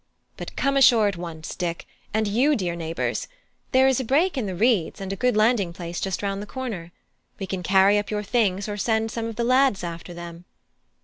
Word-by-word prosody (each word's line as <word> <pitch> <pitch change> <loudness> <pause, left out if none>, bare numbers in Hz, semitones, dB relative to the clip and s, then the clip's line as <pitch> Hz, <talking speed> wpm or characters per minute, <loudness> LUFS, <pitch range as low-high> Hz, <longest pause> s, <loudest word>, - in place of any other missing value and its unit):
But - - -8
come 275 0 +1
ashore 235 -5 +6
at 200 - -1
once, 165 -2 -7
Dick, 170 -1 -3 0.3
and 220 0 0
you, 255 +9 +3
dear 180 -6 -2
neighbours; 165 -1 -3 0.4
there 260 0 +5
is 265 -1 +2
a - - -1
break 305 +10 +2
in 250 -6 -2
the 185 - -4
reeds 215 -3 +1
and 195 0 -4
a - - -3
good 250 +2 +1
landing 215 -5 +2
place 170 0 -6
just 195 +1 -2
round 200 0 -2
the 210 - -7
corner. 215 -11 -6 0.5
We 195 - -4
can 190 -1 -4
carry 195 +3 +4
up 205 - -5
your 210 -1 -2
things, 200 -3 0
or 205 -1 -4
send 220 +1 0
some 230 -1 -3
of 225 - -6
the 235 - -1
lads 255 -5 +3
after 170 +1 -6
them." 170 0 -9
205 Hz, 215 wpm, -24 LUFS, 180-240 Hz, 0.5 s, ashore